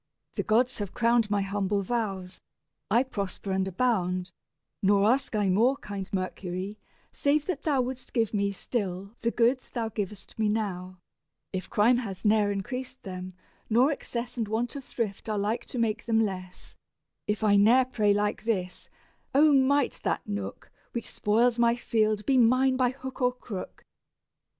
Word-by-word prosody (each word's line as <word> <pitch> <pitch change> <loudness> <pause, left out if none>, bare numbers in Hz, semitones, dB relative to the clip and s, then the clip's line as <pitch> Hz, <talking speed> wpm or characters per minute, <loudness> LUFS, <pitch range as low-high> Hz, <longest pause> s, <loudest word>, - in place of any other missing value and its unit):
The - - -1
gods 240 +3 +2
have 200 -2 -5
crowned 230 -2 +3
My 205 -1 +1
humble 200 0 -1
vows; 195 -4 -3 0.5
I 235 +5 +4
prosper 200 -5 -4
and 190 0 +1
abound: 185 -4 0 0.5
Nor 200 0 +4
ask 245 +1 +2
I 205 -3 +2
more, 240 +8 +3
kind 200 -5 -6
Mercury, 185 +1 -4 0.3
save 285 +1 +1
that 350 -7 -2
thou 285 -4 +2
Wouldst 255 0 -6
give 225 -3 0
me 200 -1 +1
still 200 -1 -4
the 230 - +2
goods 245 +2 +1
thou 230 -2 -2
giv'st 205 0 -6
me 215 -1 +2
now: 185 -4 -2 0.6
If 185 -1 -4
crime 235 +4 +4
has 205 -5 -5
ne'er 210 -1 +4
increased 250 +6 -5
them, 185 -1 -7 0.3
nor 245 +6 +4
excess 245 -4 -5
And 225 -3 -1
want 230 +5 -1
of 280 - -6
thrift 220 -4 -4
are 215 - 0
like 210 +3 -1
to - - -6
make 225 -1 -1
them 225 -1 +3
less; 185 -4 -4 0.5
If 210 +1 -1
I 205 -1 +5
ne'er 230 +6 +6
pray 215 -5 +1
like 205 +1 0
this, 185 -5 -2 0.5
"O 300 +1 +6
might 275 0 +3
that - - -2
nook 100 -1 -5 0.2
Which 235 - -3
spoils 235 +3 +2
my 235 0 +4
field 215 -3 0
be 265 -2 +4
mine 255 +3 +4
by 255 -1 +3
hook 260 0 -8
or 250 0 +3
crook! 225 -6 -8
215 Hz, 165 wpm, -28 LUFS, 195-245 Hz, 0.6 s, ne'er